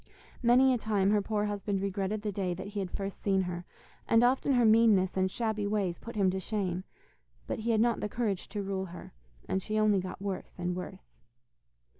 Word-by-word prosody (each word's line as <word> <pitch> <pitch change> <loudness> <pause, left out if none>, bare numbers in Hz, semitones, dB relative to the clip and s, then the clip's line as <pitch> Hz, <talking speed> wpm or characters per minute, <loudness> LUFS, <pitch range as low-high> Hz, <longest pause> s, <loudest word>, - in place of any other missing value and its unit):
Many 255 +2 +5
a 245 - 0
time 205 -3 +1
her 210 -1 +3
poor 210 0 -1
husband 205 -1 -2
regretted 200 +2 -2
the 210 - -1
day 185 -2 -2
that 190 +2 -7
he 205 0 -4
had 190 -2 -2
first 195 +1 -5
seen 195 -2 +2
her, 175 -1 -5 0.4
and 230 +1 +5
often 260 +3 +3
her 245 -2 +4
meanness 215 -4 +5
and 190 0 +2
shabby 215 -1 -1
ways 200 -4 -1
put 230 - -9
him 195 -3 +3
to 190 - -2
shame. 190 -2 -2 0.6
But - - -3
he 225 +2 -2
had 220 -2 +3
not 235 0 +2
the 210 - -3
courage 210 -5 -2
to 205 -2 -3
rule 195 -1 -2
her, 175 - -10 0.3
and 190 - 0
she 215 +3 -2
only 215 -2 +4
got 185 +1 -6
worse 195 -1 -5
and 180 0 -2
worse. - - -8
200 Hz, 210 wpm, -30 LUFS, 190-220 Hz, 0.6 s, Many